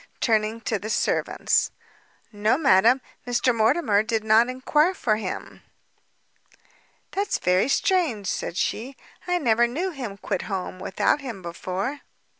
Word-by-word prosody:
turning 220 -1 +1
to 220 -2 -2
the 215 - -6
servants. - - +1 0.6
"No, 210 +3 +1
madam, 255 -3 +4 0.3
Mr 245 +1 +2
Mortimer 220 -1 +3
did 220 0 -1
not 220 +3 +4
enquire 300 +7 +1
for 215 -9 +1
him." 220 - -6 1.5
"That's 400 +1 -1
very 180 +5 +2
strange," 315 - +1
said 180 - -3
she, 255 +7 -2 0.3
"I 360 0 +2
never 240 -6 +3
knew 340 +10 -2
him 245 - -6
quit 195 -1 -3
home 185 -1 -4
without 190 +9 0
him 230 -9 -7
before." 185 +10 -4
230 Hz, 130 wpm, -24 LUFS, 205-270 Hz, 1.5 s, madam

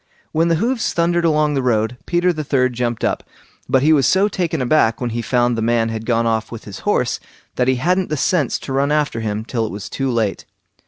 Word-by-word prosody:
When 165 +2 +2
the 165 - +3
hoofs 230 +7 0
thundered 170 0 +1
along 150 -2 +2
the 135 - 0
road, 115 -2 +1
Peter 175 +1 +2
the 155 -2 -4
third 130 -3 +1
jumped 120 -1 -2
up; - - 0 0.5
but 130 0 +3
he 155 +2 +5
was 140 -4 +3
so 195 +2 +3
taken 175 -6 -2
aback 125 -3 +2
when 125 -2 -2
he 120 +1 -2
found 120 0 +1
the 115 - -2
man 115 0 +1
had 110 0 -5
gone 115 -1 +2
off 110 -1 -1
with 115 - -8
his 100 - -9
horse - - +1 0.4
that 125 - +1
he 130 - +3
hadn't 180 +8 0
the 155 - -1
sense 150 -2 +1
to 135 - -5
run 140 +2 +1
after 150 -6 0
him 110 0 -3
till 120 -2 -2
it 110 - -3
was 100 0 -7
too 135 -1 -2
late. 115 -5 -1
130 Hz, 235 wpm, -19 LUFS, 115-155 Hz, 0.5 s, he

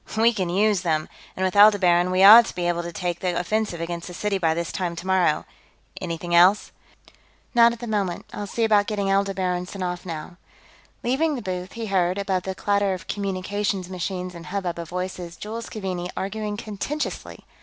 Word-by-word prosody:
"We 230 +2 +4
can 185 -5 -2
use 200 +1 +2
them! 155 -3 0 0.3
And 190 - 0
with 185 - -1
Aldebaran, 190 -4 +5
we 185 +1 +3
ought 225 +4 +10
to - - -7
be 175 -1 -1
able 175 0 0
to 170 0 -6
take 175 0 -3
the 180 -2 -1
offensive 210 -1 -1
against 170 0 -4
the 180 - -8
city 205 0 -1
by 160 -3 +1
this 170 0 -3
time 175 -2 -3
tomorrow. 180 -2 +1 0.6
Anything 175 0 -4
else?" 180 +4 +5 0.8
"Not 235 -1 +6
at 235 - -6
the - - -4
moment. 200 -6 -2
I'll 205 - -5
see 230 +4 -2
about 210 -2 +3
getting 200 -2 -1
Aldebaran 190 -2 0
sent 190 0 -6
off, 180 -1 -3
now." 170 0 -7 0.7
Leaving 290 +5 +1
the 245 - -6
booth, 185 -1 -5
he 230 -1 -5
heard, 185 -2 +1
above 195 -2 -1
the 190 +1 -5
clatter 200 -1 +1
of 180 -2 -10
communications 200 -1 -2
machines 185 0 -4
and 170 0 -10
hubbub 180 -2 -3
of 170 -1 -6
voices, 180 -1 -5
Jules 225 +2 -6
Keaveney 185 -4 -4
arguing 210 +1 -3
contentiously. 230 +8 -5
190 Hz, 190 wpm, -24 LUFS, 175-205 Hz, 0.8 s, ought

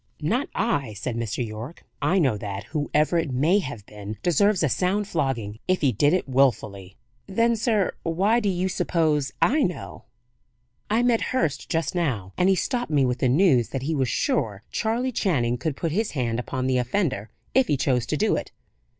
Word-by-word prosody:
"Not 240 - 0
I," 145 - 0
said 115 +4 -4
Mr. 115 +1 -2
Yorke. 110 +8 -8 0.2
"I 190 - +2
know 135 - +3
that, 100 -1 -5
whoever 150 - 0
it 165 -3 -2
may 155 +10 +3
have 130 - -6
been 105 0 -8
deserves 185 +2 +3
a - - +4
sound 190 +8 0
flogging, 130 - -2
if 185 0 +1
he 140 -4 +3
did 145 +7 +3
it 180 -3 0
willfully." 105 -8 0 0.3
"Then, 230 +4 +2
sir, 220 -3 +1
why 195 +8 +2
do 210 -4 0
you 185 0 0
suppose 155 -6 0
I 295 +5 +3
know?" 180 -7 -3 0.8
"I 225 +3 +2
met 240 -2 +3 0.2
Hurst 150 - -1
just 165 +3 -1
now, 125 - -2
and 180 +1 +3
he 190 - +4
stopped 245 +6 -1
me 145 -3 +3
with 125 0 -1
the 130 - +2
news 130 - +4
that 130 - -4
he 160 +4 -1
was 135 -5 0
sure 100 -3 -1
Charley 235 +3 0
Channing 125 - 0
could 155 -4 -2
put 165 - -2
his 215 +6 -1
hand 120 -4 -1
upon 130 +1 -3
the 130 -1 +2
offender, 125 - -1 0.2
if 265 -1 +4
he 145 - +1
chose 125 -3 +1
to - - -1
do - - +2
it. - - -4
150 Hz, 195 wpm, -24 LUFS, 125-190 Hz, 0.8 s, a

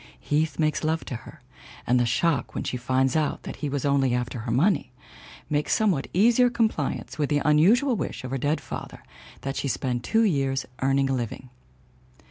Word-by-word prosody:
Heath 150 - 0
makes 155 0 0
love 160 +1 0
to 125 - -5
her 115 - -12 0.4
and 125 +1 +3
the 120 - +2
shock 145 +2 0
when - - -2
she - - -3
finds 130 +2 +1
out 155 -2 0
that - - -7
he 150 - -3
was 140 -1 -2
only 135 -3 +2
after 125 0 -3
her 115 +1 -4
money 140 - +2 0.6
makes 150 -1 0
somewhat 195 -11 +1
easier 235 +6 +4
compliance 220 - -1
with 145 - +1
the 145 -1 +1
unusual 215 - +4
wish - - -4
of 130 - -6
her 135 - -2
dead 145 +5 0
father - - -8 0.4
that 135 +1 -4
she 140 - -2
spend 120 +2 -2
two 225 - +2
years 135 -8 +1 0.2
earning 135 +1 +2
her - - +1
living. 125 0 -4
140 Hz, 190 wpm, -25 LUFS, 130-160 Hz, 0.6 s, easier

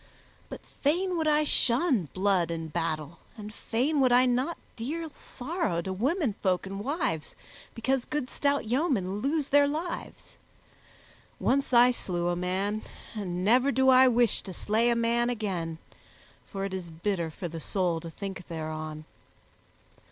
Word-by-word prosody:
But - - -9
fain 355 +6 0
would 320 -2 0
I 300 0 +4
shun 250 - +3
blood 185 -3 +1
and 165 -2 -5
battle, 165 -1 -2 0.2
and 210 0 -8
fain 270 +8 0
would 255 -2 +4
I 250 +1 +6
not 255 +7 0 0.2
deal 310 +7 -4
sorrow 270 - -3
to 190 - -3
womenfolk 215 - 0
and 195 +1 -5
wives 245 - -2 0.4
because 255 +2 0
good 295 -4 -2
stout 280 -1 0
yeomen 230 - 0
lose 285 +4 -1
their 285 0 +5
lives. 320 +4 -5 1.0
Once 275 +1 +1
I 245 0 +7
slew 175 -7 -2
a 175 - 0
man, 190 +4 -1 0.3
and 185 -4 -3
never 250 +6 +4
do 265 +1 +3
I 260 0 +7
wish 240 -2 +3
to 190 - -8
slay 220 +6 +1
a 235 - +3
man 235 +1 +2
again, 185 -9 -3 0.7
for 195 0 -4
it 195 - -5
is 185 -2 -5
bitter 170 +1 -2
for 175 +3 -6
the 165 0 -6
soul 175 0 0
to 165 0 -8
think 190 0 -7
thereon. 155 -1 -5
220 Hz, 150 wpm, -28 LUFS, 180-265 Hz, 1.0 s, I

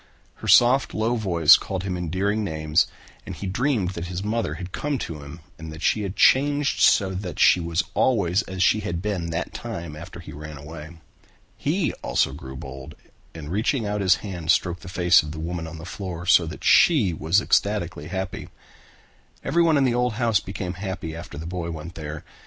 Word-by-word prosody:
Her - - -8
soft 125 +3 +5
low 110 +3 +1
voice 85 -8 +5
called 95 -1 -5
him 95 -2 -3
endearing 95 +5 -1
names 80 -2 +1 0.4
and - - -7
he - - -7
dreamed 105 -1 0
that 85 -2 -6
his 90 +2 -4
mother 105 -7 -1
had 90 +1 -7
come 150 +5 -2
to 80 - -6
him 70 +4 -10 0.2
and 80 -1 -8
that 80 +2 -9
she 110 - +2
had 100 -1 -4
changed 145 +1 +3
so 95 -2 +4
that 90 -4 -5
she - - +5
was 85 -1 -1
always 100 -6 +2
as 95 0 -1
she 110 - +4
had 85 -5 -3
been 95 -6 -2
that 80 +1 -3
time 85 -10 -6
after 85 +3 -10
he 85 -3 -10
ran 75 0 -8
away. 80 +3 -10 0.6
He 160 +3 -1
also - - +1
grew 65 0 -9
bold 65 0 -9 0.4
and 75 -2 -8
reaching 115 +4 0
out 105 0 -2
his 95 -1 +5
hand 85 -5 -6
stroked 90 0 +2
the 95 - -9
face 90 -1 +4
of 75 0 -7
the 80 - -7
woman 85 0 -4
on 80 +1 -8
the 80 - -9
floor 90 -2 -6
so 85 -1 +5
that 80 - -8
she 125 - +5
was 80 +5 +2
ecstatically 90 -8 0
happy. 95 +1 -5 0.9
Everyone 165 -2 +3
in 140 - +3
the 125 -2 +2
old 125 -1 +1
house 115 -3 +2
became 95 -2 -5
happy 95 -5 -4
after 85 -3 -9
the 80 - -6
boy 85 -1 -4
went 80 +1 -7
there. 75 -2 -7
90 Hz, 200 wpm, -24 LUFS, 80-105 Hz, 0.9 s, soft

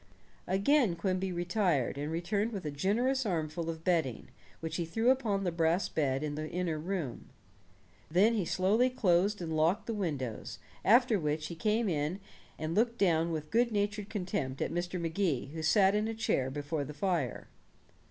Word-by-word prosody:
Again 200 - +3
Quimby 185 +2 -1
retired, 175 - 0
and 145 +2 -3
returned 200 +7 -1
with 195 -5 -5
a 150 - -2
generous 235 - +1
armful 165 -4 -2
of 160 -1 -5
bedding, 165 -9 0 0.3
which 160 0 -4
he 175 - 0
threw 225 +9 +2
upon 220 -7 0
the 180 - 0
brass 165 +2 +1
bed 135 -2 0
in 150 -1 -2
the 155 +1 -4
inner 170 -3 -2
room. 165 -6 -4 0.8
Then 195 +8 +4
he 215 -4 +1
slowly 205 +9 +2
closed 200 -4 +2
and 160 -1 -3
locked 160 +5 +2
the 230 - -3
windows, 145 - -3 0.3
after 235 0 +5
which 155 -1 -1
he 170 - -6
came 215 +6 +1
and 160 0 -4
looked 235 +2 +2
down 170 -4 +2
with 155 -1 -4
good 235 +1 +3
natured 205 0 -1
contempt 160 -9 -3
at - - -1
Mr. 175 +1 -2
Magee, 165 -5 -1
who 160 - -4
sat 190 +4 +4
in 210 +1 +1
a 225 - -3
chair 135 -11 0
before 145 +2 -3
the 145 +1 -8
fire. 165 - -1
175 Hz, 170 wpm, -31 LUFS, 155-205 Hz, 0.8 s, after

